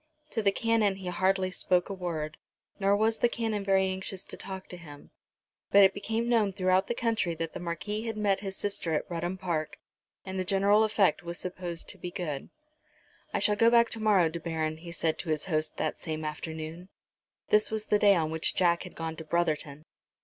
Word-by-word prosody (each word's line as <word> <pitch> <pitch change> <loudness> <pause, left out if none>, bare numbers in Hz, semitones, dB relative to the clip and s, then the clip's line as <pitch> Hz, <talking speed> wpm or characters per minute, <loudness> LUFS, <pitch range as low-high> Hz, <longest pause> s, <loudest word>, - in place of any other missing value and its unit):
To 225 - 0
the 200 -2 +3
Canon 225 -2 +2
he 190 -2 -5
hardly 185 +1 +1
spoke 180 -1 +1
a 200 - -4
word, 160 -5 -4 0.4
nor 200 0 +3
was 220 +1 +2
the 240 - +4
Canon 220 -3 -2
very 195 -1 +3
anxious 190 0 -4
to - - -7
talk 190 0 -7
to 180 - -6
him. 150 -4 -13 0.6
But 200 0 +7
it 190 0 +6
became 225 +4 -2
known 220 -5 +3
throughout 185 +1 +2
the 235 - -1
country 225 -8 0
that 165 0 -4
the - - -5
Marquis 205 +6 -3
had 225 -1 -3
met 205 -2 +2
his 195 -1 -6
sister 180 -5 -1
at - - -1
Rudham 175 +2 -2
Park, 170 -5 -2 0.5
and 190 0 -4
the - - +1
general 200 +3 +4
effect 215 -3 +3
was 170 0 -5
supposed 180 -2 -4
to - - -7
be 180 - -5
good. 170 -7 -4 0.8
"I - - 0
shall 210 - +3
go 230 +2 +5
back 235 0 +5
to 225 - -2
morrow, 205 -6 +4
De 165 +1 -4
Baron," 160 -1 -2
he 170 +1 -9
said 165 -2 -1
to 170 - -5
his 155 -1 0
host 155 -3 -1
that - - -2
same 155 -2 -4
afternoon. 160 +3 -6 0.6
This 210 0 +4
was 220 -1 -3
the 210 - +2
day 200 -1 +6
on 160 -2 0
which 160 0 0
Jack 170 -1 +3
had 180 - -9
gone 160 -1 -4
to 160 - -6
Brotherton. 155 -3 -1
185 Hz, 210 wpm, -29 LUFS, 165-205 Hz, 0.8 s, But